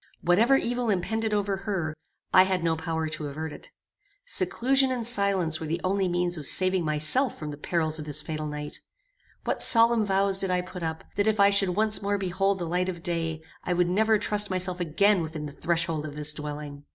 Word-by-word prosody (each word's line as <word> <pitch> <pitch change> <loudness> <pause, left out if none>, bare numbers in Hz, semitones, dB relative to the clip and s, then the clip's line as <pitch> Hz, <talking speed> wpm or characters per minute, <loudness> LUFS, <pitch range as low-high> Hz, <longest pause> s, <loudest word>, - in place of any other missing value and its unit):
Whatever 220 +10 +4
evil 245 -2 -1
impended 220 +3 -1
over 200 -2 -1
her, 190 -6 -3 0.4
I 185 - +8
had 185 -2 0
no 165 -1 +1
power 160 0 -3
to 155 -1 -3
avert 155 +2 -6
it. - - -12 0.6
Seclusion 270 - +2
and 245 -3 -3
silence 200 -8 0
were 160 - -6
the 165 +3 -2
only 190 +1 0
means 175 0 -1
of 145 - -1
saving 185 -1 +3
myself 155 - +2
from 150 -1 -6
the 145 - -8
perils 160 0 -1
of 150 - -7
this 150 -1 -1
fatal 155 -1 -5
night. 150 0 -7 0.6
What - - -2
solemn 230 -1 +6
vows 195 -1 +2
did 195 - 0
I 180 0 0
put 180 0 -9
up, 160 -1 -4
that 205 +1 +1
if 215 -1 +1
I 200 0 +5
should 195 -3 +2
once 215 +1 +3
more 200 0 -1
behold 195 +1 -1
the 175 - -4
light 180 +2 -1
of 170 -2 -7
day, 165 -2 -1 0.2
I 180 - -1
would 175 0 +1
never 220 +4 +2
trust 210 0 0
myself 185 -1 -2
again 180 +4 +2
within 160 -1 -6
the 145 - -7
threshold 165 0 -2
of 145 - -9
this 150 0 +3
dwelling! 145 -1 -8
180 Hz, 210 wpm, -26 LUFS, 160-200 Hz, 0.6 s, I